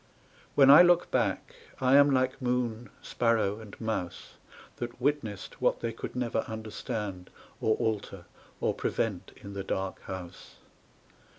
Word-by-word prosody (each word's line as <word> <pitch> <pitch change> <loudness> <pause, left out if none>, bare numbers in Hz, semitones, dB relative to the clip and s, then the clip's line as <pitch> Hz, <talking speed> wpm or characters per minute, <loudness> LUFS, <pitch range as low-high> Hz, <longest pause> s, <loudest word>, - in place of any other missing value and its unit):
When 135 -1 +8
I 145 - +11
look 175 -1 +4
back - - 0 0.3
I 130 +1 +4
am 140 0 +7
like 130 -1 +1
moon, 125 -2 -1
sparrow, 110 -3 +1
and 110 -3 -12
mouse 110 -6 -4 0.4
That 120 0 -6
witnessed 130 -7 -2
what - - +2
they 115 -1 -2
could 115 - -7
never 120 -3 -1
understand 105 -3 -5 0.3
Or 110 - +3
alter 100 -4 -3 0.3
or - - +1
prevent 100 -5 -2
in 100 0 -10
the 100 -1 -4
dark 95 0 -3
house. 95 -2 -8
110 Hz, 135 wpm, -29 LUFS, 100-125 Hz, 0.4 s, I